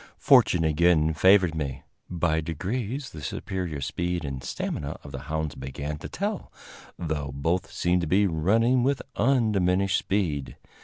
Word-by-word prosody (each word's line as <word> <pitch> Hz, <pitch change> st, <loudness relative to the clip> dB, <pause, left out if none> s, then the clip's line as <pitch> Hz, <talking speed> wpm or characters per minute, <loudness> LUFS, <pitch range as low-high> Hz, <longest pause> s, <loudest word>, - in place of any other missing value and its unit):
Fortune 85 Hz, -, +5 dB
again 80 Hz, 0 st, +3 dB
favored 95 Hz, +1 st, +5 dB
me. 70 Hz, -5 st, -4 dB, 0.3 s
By 85 Hz, -2 st, 0 dB
degrees 110 Hz, -, -4 dB
the 80 Hz, -, -9 dB
superior 85 Hz, +1 st, -4 dB
speed 85 Hz, +4 st, -2 dB
and 65 Hz, -2 st, -5 dB
stamina 70 Hz, +4 st, -4 dB
of 70 Hz, -, -10 dB
the 70 Hz, -, -6 dB
hounds 80 Hz, -2 st, -2 dB
began 70 Hz, +3 st, -5 dB
to 85 Hz, -, -7 dB
tell, 205 Hz, 0 st, -4 dB, 0.5 s
though 75 Hz, -4 st, -3 dB
both 80 Hz, +7 st, -1 dB
seemed 90 Hz, 0 st, +1 dB
to 85 Hz, -, -2 dB
be 100 Hz, +6 st, +3 dB
running 110 Hz, +9 st, +2 dB
with 135 Hz, +2 st, 0 dB
undiminished 100 Hz, -7 st, +2 dB
speed. 85 Hz, -9 st, -2 dB
85 Hz, 145 wpm, -26 LUFS, 75-100 Hz, 0.5 s, Fortune